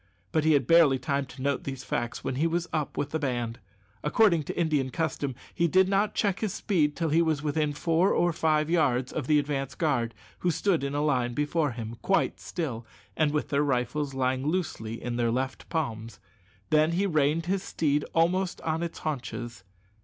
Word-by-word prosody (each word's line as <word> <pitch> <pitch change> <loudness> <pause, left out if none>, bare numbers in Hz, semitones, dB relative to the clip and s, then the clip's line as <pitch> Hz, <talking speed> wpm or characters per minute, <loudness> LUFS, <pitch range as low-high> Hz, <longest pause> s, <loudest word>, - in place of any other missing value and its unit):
But 155 - +2
he 160 - +5
had 140 -4 +3
barely 160 -3 +6
time 140 0 -1
to 130 - -9
note 140 -1 0
these 135 -1 -5
facts 120 -2 -3
when - - -2
he 150 +6 +1
was 170 +1 -1
up 150 -3 -2
with 145 - -2
the 160 - -1
band. 120 -5 -2 0.4
According 170 +2 +4
to - - -4
Indian 150 -6 +1
custom, 140 -3 -2 0.2
he 170 - +2
did 185 +3 +4
not 200 +2 +1
check 200 -1 +1
his 215 -2 -2
speed 155 -8 +1
till 165 -2 -1
he 160 +3 +4
was 155 -3 0
within 150 0 0
four 165 +5 +2
or 175 0 +2
five 155 -1 +2
yards 135 -7 +1
of 145 -5 -3
the 150 - +4
advance 140 -2 -2
guard, 125 -8 0 0.2
who 180 - +1
stood 175 -1 +1
in 140 +1 -2
a 145 - +1
line 125 -5 +1
before 150 -1 0
him, 115 -1 -6
quite 195 - +1
still, 130 -10 -4 0.3
and 150 -2 +2
with 150 0 -1
their 140 0 +2
rifles 135 +1 -1
lying 130 0 0
loosely 140 -10 -2
in 120 -1 -4
their 120 -1 +1
left 130 +3 -3
palms; 115 - -3 0.5
then 155 +2 +4
he 190 +4 +1
reined 155 -2 +1
his 190 +2 0
steed 150 -5 0
almost 175 +3 +2
on 160 0 -1
its 170 -1 -4
haunches. 120 -7 -5
150 Hz, 200 wpm, -28 LUFS, 130-165 Hz, 0.5 s, barely